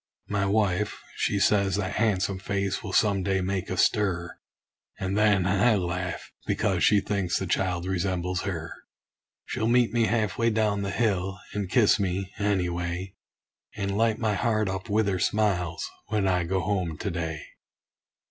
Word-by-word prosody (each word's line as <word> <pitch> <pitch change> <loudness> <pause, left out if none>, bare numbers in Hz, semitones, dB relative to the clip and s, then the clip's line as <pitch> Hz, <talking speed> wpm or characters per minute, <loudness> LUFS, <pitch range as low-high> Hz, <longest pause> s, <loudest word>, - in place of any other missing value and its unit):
My 100 -1 0
wife, 100 -1 +1 0.2
she 100 - +1
says 100 -1 +3
that 100 -1 -2
han'some 100 -3 +1
face 100 -1 -2
will 95 - -6
some 100 -2 +3
day 95 0 +1
make 95 0 -2
a 95 - -3
stir; 90 -5 +1 0.6
And 95 +1 -2
then 105 -3 +3
I 100 +5 +3
laugh, 90 -1 -3 0.2
because - - +1
she 105 -1 +5
thinks 100 -4 -1
the 95 - -2
child 90 -1 0
resembles 90 -1 -1
her. 85 -5 -4 0.7
She'll 110 - -2
meet 120 0 +3
me 115 -1 +3
half 110 -3 0
way 115 0 +3
down 105 -2 +1
the 100 - -2
hill, 95 -3 0
and 100 -3 -3
kiss 105 0 +4
me, 95 0 -2
any 100 -3 +1
way; 90 +2 -4 0.6
And 100 -2 -2
light 110 0 +2
my 110 -2 0
heart 110 +1 +1
up 95 +3 -4
with 105 +1 +2
her 95 -2 0
smiles, 90 -4 0 0.2
when 105 -2 0
I 90 -2 +1
go 95 +2 0
home 90 -4 -1
to 100 - -3
day! 80 -2 -3
95 Hz, 165 wpm, -27 LUFS, 90-105 Hz, 0.7 s, she